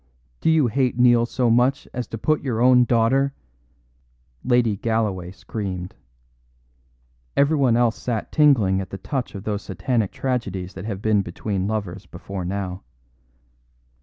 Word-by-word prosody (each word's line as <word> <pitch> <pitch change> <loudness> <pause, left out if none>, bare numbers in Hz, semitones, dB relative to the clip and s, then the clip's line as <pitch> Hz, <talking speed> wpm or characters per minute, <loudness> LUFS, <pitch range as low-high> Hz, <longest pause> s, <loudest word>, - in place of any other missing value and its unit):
Do - - +1
you 160 -3 +4
hate 125 +1 0
Neil 120 -1 +5
so 120 -1 +1
much 125 +4 +2
as 125 -3 -4
to 115 - -6
put 155 +7 +1
your 120 -5 -2
own 125 0 +6
daughter 130 +4 +2 0.5
" - - -40
Lady 115 -4 +3
Galloway 105 -5 -1
screamed. 95 -2 -6 1.4
Everyone 140 -4 +3
else 120 -2 +1
sat 115 -4 -3
tingling 115 -11 +4
at 95 - -7
the 95 - -6
touch 125 +3 -4
of 100 - -7
those 105 -1 -2
satanic 110 +1 -1
tragedies 100 -8 -3
that 95 +1 -8
have 100 -3 -5
been 110 -2 +3
between 95 +2 -3
lovers 105 -5 -4
before 95 -2 -7
now. 95 0 -4
110 Hz, 145 wpm, -23 LUFS, 95-125 Hz, 1.4 s, own